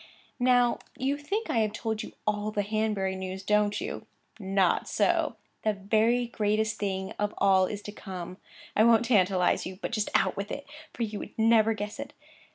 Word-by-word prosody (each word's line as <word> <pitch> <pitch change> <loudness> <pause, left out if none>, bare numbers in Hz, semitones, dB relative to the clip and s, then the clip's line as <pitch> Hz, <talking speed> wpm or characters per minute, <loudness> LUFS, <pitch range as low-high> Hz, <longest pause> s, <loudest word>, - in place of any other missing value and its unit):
'Now 245 -1 +3 0.2
you 270 +1 0
think 395 +10 -3
I 230 - +2
have 215 -1 +1
told 220 0 -2
you - - -8
all 210 0 0
the 210 -1 -1
Hanbury 210 -2 -1
news, 190 0 -5
don't 210 0 +2
you? 390 +7 -5 0.3
Not 195 -2 +1
so. - - +1 0.3
The 215 - +1
very 220 +5 +2
greatest 215 -1 0
thing 190 -2 -2
of 210 0 -1
all 190 -1 +4
is 205 +1 -6
to 205 - -6
come. 185 -3 -7 0.4
I 215 - +5
won't 235 0 +5
tantalize 190 -7 +3
you, 185 0 -8
but - - -4
just 215 -2 -1
out - - +3
with 200 +1 -4
it, 285 - -5 0.3
for 235 - -3
you 210 -2 -3
would - - -9
never 225 0 +4
guess 210 0 -5
it. - - -6
210 Hz, 185 wpm, -28 LUFS, 195-225 Hz, 0.4 s, I